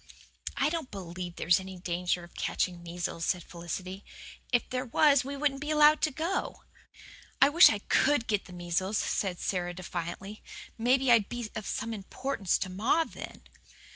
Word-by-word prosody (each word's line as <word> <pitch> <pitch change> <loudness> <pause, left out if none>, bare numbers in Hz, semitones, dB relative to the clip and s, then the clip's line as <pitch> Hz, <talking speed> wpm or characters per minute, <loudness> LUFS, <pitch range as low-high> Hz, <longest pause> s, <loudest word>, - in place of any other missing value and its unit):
"I 280 - +3
don't 325 -4 -3
believe 175 -2 -7
there's 170 +2 +3
any 190 0 -8
danger 175 0 -1
of 170 - -14
catching 175 -2 -2
measles," 170 -1 -4
said 180 0 0
Felicity. 180 +3 -6 0.5
"If 245 -1 +2
there 255 0 -2
was 280 +2 +4
we 280 +2 -5
wouldn't 275 -1 0
be 295 - -4
allowed 300 0 +6
to - - +3
go." 325 +7 -3 0.8
"I 275 - +7
wish 335 +5 +8
I 215 - 0
COULD 290 -4 +3
get 210 -4 0
the - - -13
measles," 180 +4 -1
said 190 -3 -1
Sara 175 -2 -2
defiantly. 185 +3 -6 0.3
"Maybe 255 +2 +3
I'd 225 -4 +5
be 240 -3 -5
of 215 -2 -5
some 225 0 -3
importance 215 0 -2
to 190 - -3
ma 225 - +2
then." - - -10
205 Hz, 170 wpm, -29 LUFS, 180-270 Hz, 0.8 s, wish